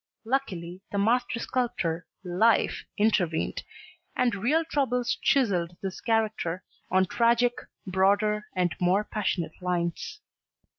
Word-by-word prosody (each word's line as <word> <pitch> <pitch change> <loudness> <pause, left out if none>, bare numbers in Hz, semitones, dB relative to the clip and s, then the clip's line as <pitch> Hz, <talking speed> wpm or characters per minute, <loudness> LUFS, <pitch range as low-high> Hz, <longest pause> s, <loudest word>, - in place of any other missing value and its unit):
Luckily 190 -9 -2
the 200 - -2
master 235 +4 +2
sculptor 235 -10 -2 0.2
Life 200 +5 +2
intervened 185 -6 +1 0.5
and 250 -1 +2
real 265 +12 +1
troubles 250 -6 0
chiselled 180 -10 +2
his 190 -1 -4
character 215 -6 0 0.3
on 190 +1 +3
tragic, 235 +4 +3 0.3
broader 205 +3 +2
and 180 -1 +1
more 185 +3 +3
passionate 185 -6 -3
lines. 175 - -2
205 Hz, 105 wpm, -27 LUFS, 180-235 Hz, 0.5 s, on